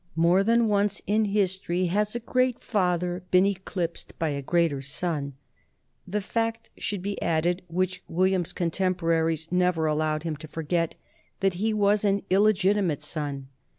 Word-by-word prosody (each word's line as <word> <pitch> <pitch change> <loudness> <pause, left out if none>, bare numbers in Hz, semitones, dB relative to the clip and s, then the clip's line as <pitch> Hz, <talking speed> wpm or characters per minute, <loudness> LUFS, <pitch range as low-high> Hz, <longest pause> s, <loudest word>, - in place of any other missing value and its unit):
More 170 +3 +4
than 230 +2 +3
once 205 0 +1
in 215 +1 +2
history 190 -3 0
has 210 +5 0
a - - -1
great 255 +1 +1
father 180 -3 0
been 185 +1 +5
eclipsed 185 -3 -3
by 160 - 0
a 140 -1 -2
greater 165 -1 +1
son. 140 0 -3 0.7
The 210 +3 -1
fact 225 +2 -2
should 200 -4 -4
be 200 0 -3
added, 170 +3 +1
which 185 +2 -1
William's 185 0 +1
contemporaries 165 -2 0
never 180 -3 +2
al 150 -1 +1
lowed 155 0 0
him 160 -3 -3
to 155 +1 -10
forget, 165 +2 -1 0.5
that 195 -1 +2
he 220 +1 +2
was 210 0 +2
an 200 -1 +1
illegitimate 195 -5 +3
son. 145 -3 -4
180 Hz, 150 wpm, -26 LUFS, 165-200 Hz, 0.7 s, been